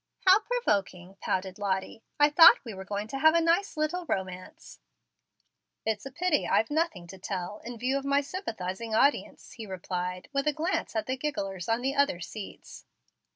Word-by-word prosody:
"How 380 +2 +7
provoking!" 195 - -2
pouted 190 +1 -2
Lottie. 195 +2 -2 0.2
"I 295 0 +5
thought 325 -2 +8
we 225 - -6
were 190 0 -8
going 205 +2 -4
to 270 - -4
have 315 +3 +5
a - - +5
nice 335 +2 +1
little 330 +3 -1
romance." 190 - -5 1.1
"It's 220 +2 -2
a - - -10
pity 345 +1 0
I've 220 - +2
nothing 300 - -1
to 190 +2 -12
tell, 190 +1 -5
in 240 0 -7
view 260 +4 0
of - - -10
my 280 +1 +2
sympathizing 225 - -4
audience," 280 +6 +1
he 230 -5 -9
replied, 180 -1 -4
with 275 +1 0
a 300 - +3
glance 320 -4 -2
at 220 - 0
the 260 +1 -2
gigglers 195 - -4
on 230 +2 0
the 270 +1 0
other 280 -10 +2
seats. 195 +4 -9
230 Hz, 180 wpm, -28 LUFS, 190-300 Hz, 1.1 s, thought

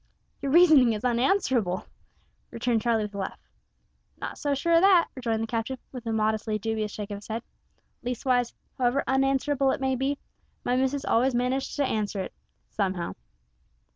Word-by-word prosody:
'" - - -43
"Your 275 - -1
reasoning 310 -8 +7
is 210 - -5
unanswerable," 240 - +1 0.6
returned 230 -1 0
Charlie, 225 -1 +1
with 210 0 -6
a 200 - -5
laugh. 190 - -4 0.8
"Not - - -5
so 285 -1 0
sure 335 +5 +1
o' 335 - +6
that," 370 -3 +5
rejoined 230 -4 -1
the - - 0
captain, 230 +3 -3
with 245 -3 -8
a - - 0
modestly 215 0 0
dubious 215 0 -2
shake 210 0 -6
of 205 - -3
his 205 - -14
head; 225 +1 -4 0.6
"leastwise, 245 0 0 0.3
however 250 +2 +2
unanswerable 270 +1 +2
it - - 0
may 265 -1 +1
be, 270 +3 -1 0.5
my 245 - +2
missus 265 +2 0
always 250 +2 +2
manages 250 +2 0
to 285 - +1
answer 210 -4 -1
it - - -6 0.4
somehow." 190 -4 -1
245 Hz, 170 wpm, -27 LUFS, 220-270 Hz, 0.8 s, reasoning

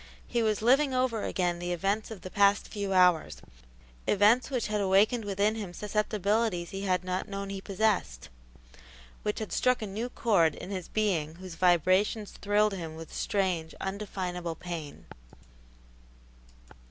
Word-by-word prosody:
He 240 - -1
was 215 -1 0
living 265 +3 +4
over 255 -4 +1
again 175 -3 -1
the 175 0 -2
events 195 +5 -1
of 220 -4 -8
the 185 - -8
past 200 0 +3
few 200 -2 -4
hours 180 - +3 0.7
events 210 +6 +4
which 250 -4 -1
had 210 -1 -1
awakened 200 +5 +3
within 205 +2 +1
him 205 -5 -6
susceptibilities 210 -2 0
he 195 - -5
had 185 -2 +1
not 185 0 -3
known 200 0 -5
he 195 -1 -5
possessed, 195 - -1 0.9
which 210 - -2
had 220 - -5
struck 250 0 +2
a 215 - -4
new 215 +5 -4
chord 185 -11 +2
in 195 - -8
his 185 -3 -4
being 170 -8 0
whose 185 0 -9
vibrations 185 +5 +2
thrilled 205 +1 +1
him 165 -4 -6
with 165 0 -10
strange, 180 -5 -1
undefinable 185 -4 -4
pain. 165 -3 -7
195 Hz, 150 wpm, -29 LUFS, 180-215 Hz, 0.9 s, living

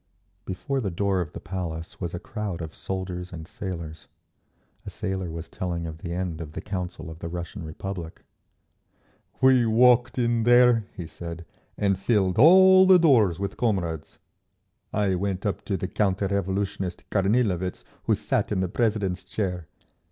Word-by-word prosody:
Before 135 +9 -2
the 100 - -1
door 95 +1 0
of 80 -4 -6
the - - -6
Palace 85 -3 -6
was 85 -1 -3
a - - -4
crowd 105 -4 -5
of 80 - -7
soldiers 90 -1 -5
and 80 -2 -8
sailors. 85 -5 -7 0.8
A - - -7
sailor 95 -2 -3
was 80 0 -6
telling 85 -2 -4
of 80 -1 -7
the 85 - -6
end 85 -2 -3
of 75 -2 -8
the - - -5
Council 90 -4 -5
of 80 - -11
the 85 - -5
Russian 85 0 -6
Republic. 85 +1 -7 1.2
"We 130 -2 +6
walked 125 +3 +4
in 120 -1 +2
there," 120 -1 +5
he 85 - -5
said, 85 +1 -8 0.3
"and 100 -2 +1
filled 100 -2 +1
all 185 +5 +8
the 190 -1 +8
doors 120 - +4
with 100 0 -4
comrades. 85 -9 -2 0.7
I 100 -2 +1
went 95 +2 -2
up 100 - -2
to 100 - -1
the 95 - -3
counter 100 0 0
revolutionist 95 -1 -2
Kornilovitz 100 -3 +1 0.2
who - - +3
sat - - -1
in 100 - 0
the 95 - -1
president's 105 -5 0
chair. 90 -6 -3
95 Hz, 160 wpm, -25 LUFS, 85-110 Hz, 1.2 s, all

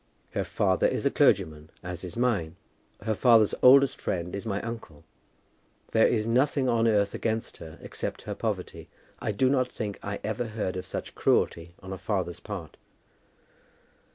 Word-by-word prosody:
Her - - -1
father 95 -3 +1
is - - -2
a - - +3
clergyman, 75 0 +2
as 90 0 -6
is 90 +4 -7
mine. 105 -10 0 0.5
Her 110 0 0
father's 110 -1 +5
oldest 135 +2 +6
friend 90 -1 -2
is 100 +3 -5
my 100 -2 -1
uncle. 115 -10 -7 0.9
There 110 - +5
is 110 -2 +1
nothing 130 +3 +2
on 115 -2 +3
earth 100 -2 +2
against 110 0 -2
her 80 -1 -10
except - - -5
her - - -4
poverty. - - -4 0.3
I 110 - -2
do 115 +6 +2
not 130 -1 +1
think 105 -3 -5
I 100 0 -4
ever 110 +2 -2
heard 105 -4 -3
of 95 0 -5
such - - -5
cruelty 85 +1 +1
on 95 0 -6
a 95 - -7
father's 95 -3 -2
part." 95 -8 -7
105 Hz, 165 wpm, -27 LUFS, 90-115 Hz, 0.9 s, oldest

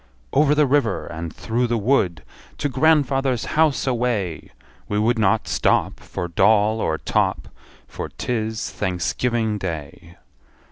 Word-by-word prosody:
Over 150 0 +4
the 150 0 +4
river, 130 -7 +1
and 85 -1 -6
through 120 +8 -1
the 120 0 0
wood, 100 - +1 0.3
To 145 - -1
grandfather's 135 -3 +2
house 155 -2 +2
away! 115 - -1 0.4
We 105 - 0
would 115 +2 +2
not 105 +1 +2
stop - - +1
For 90 - -5
doll 105 +5 +3
or 80 - 0
top, - - -1 0.4
For - - -6
't - - -5
is 110 -1 -3
Thanksgiving 105 +4 -1
Day. 85 -1 -7
110 Hz, 135 wpm, -22 LUFS, 95-130 Hz, 0.4 s, Over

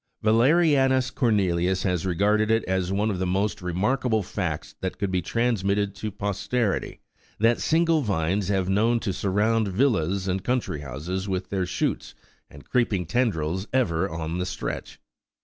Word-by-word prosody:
Yalerianus 130 +2 +3
Cornelius 95 -6 +1
has 90 -2 0
regarded 105 +4 +2
it 115 0 +3
as 95 -1 -1
one 105 +3 +1
of 95 - -3
the 95 - -1
most 100 +3 -1
re 90 0 -3
markable 110 +3 +1
facts 90 -5 -4
that 95 - -3
could 100 -2 -2
be 90 -1 +1
transmitted 100 -2 0
to 110 - -5
posterity, 105 +2 -2 0.4
that 115 +2 +3
single 165 -1 +2
vines 95 - 0
have 95 -2 +1
been 95 - 0
known 115 +4 +2
to 100 -4 -2
surround 105 +4 +1
villas 95 - +1
and 95 0 -1
country 125 - -1
houses 80 +8 -5
with 95 0 -3
their 95 -2 -1
shoots - - -2 0.3
and 70 - -15
creeping 105 -7 +1
tendrils 95 -5 -1
ever 90 -11 +1
on 80 +1 -4
the 90 - -1
stretch. - - -5
100 Hz, 160 wpm, -25 LUFS, 90-115 Hz, 0.4 s, Yalerianus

